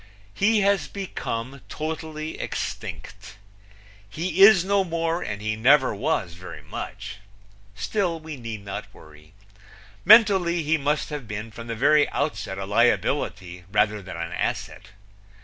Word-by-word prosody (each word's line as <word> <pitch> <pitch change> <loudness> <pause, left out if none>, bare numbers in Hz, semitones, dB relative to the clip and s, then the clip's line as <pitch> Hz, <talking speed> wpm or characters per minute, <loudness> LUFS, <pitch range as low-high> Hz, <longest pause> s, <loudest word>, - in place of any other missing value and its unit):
He 215 - +3
has 200 0 +2
become 135 - -5
totally 155 0 -5
extinct. 100 +2 -6 0.7
He 170 - -2
is 195 -3 +8
no 200 0 +2
more 165 -1 -1
and 105 -5 -5
he 110 0 -1
never 130 +4 +4
was 105 - -1
very 90 +2 -10
much. 100 +1 -7 0.6
Still 180 - -1
we 155 -1 -8
need 115 -5 -7
not 100 - -6
worry. 75 +1 -17 0.7
Mentally 190 -7 +6
he 155 +2 +2
must 150 0 -1
have 145 -6 -5
been 110 +2 -6
from 115 +2 -9
the 115 - -3
very 145 +5 +4
outset 140 -9 -3
a 95 - -4
liability 95 -4 0
rather 105 0 +2
than 95 -3 -8
an 85 0 -4
asset. - - -3
140 Hz, 135 wpm, -24 LUFS, 105-165 Hz, 0.7 s, is